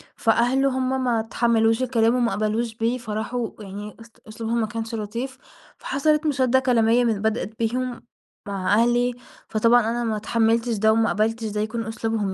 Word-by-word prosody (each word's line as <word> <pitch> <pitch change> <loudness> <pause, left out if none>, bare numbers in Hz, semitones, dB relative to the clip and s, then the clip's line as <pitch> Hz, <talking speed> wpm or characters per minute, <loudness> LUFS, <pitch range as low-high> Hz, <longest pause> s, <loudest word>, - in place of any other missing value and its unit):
فأهله 245 +4 +2
هُم 260 0 0
ما 240 -2 +1
اتحملوش 225 +1 +1
الكلام 230 -2 +2
وما 240 -2 +1
قبلوش 220 +2 -1
بيه 230 +3 0
فراحوا 230 +1 -3
يعني 205 0 -8
است 230 0 -16
أسلوبهم 225 +2 -2
ما 220 - 0
كانش 225 +1 -5
لطيف/ 235 +5 -5 0.4
فحصلت 300 +3 0
مُشادة 260 -3 +2
كلامية 245 -2 +3
من 220 -4 0
بدأت 220 0 -2
بيهم 245 +2 -2 0.5
مع 195 0 -1
أهلي، 240 +2 +3 0.4
فطبعًا 230 +2 +4
أنا 235 +2 -1
ما 220 -2 -1
اتحملتش 230 +2 +1
ده 220 +2 +4
وما 225 0 +2
قبلتش 225 +2 0
ده 210 0 -2
يكون 225 +1 -3
أسلوبهم 225 -3 -2
230 Hz, 160 wpm, -23 LUFS, 220-245 Hz, 0.5 s, فطبعًا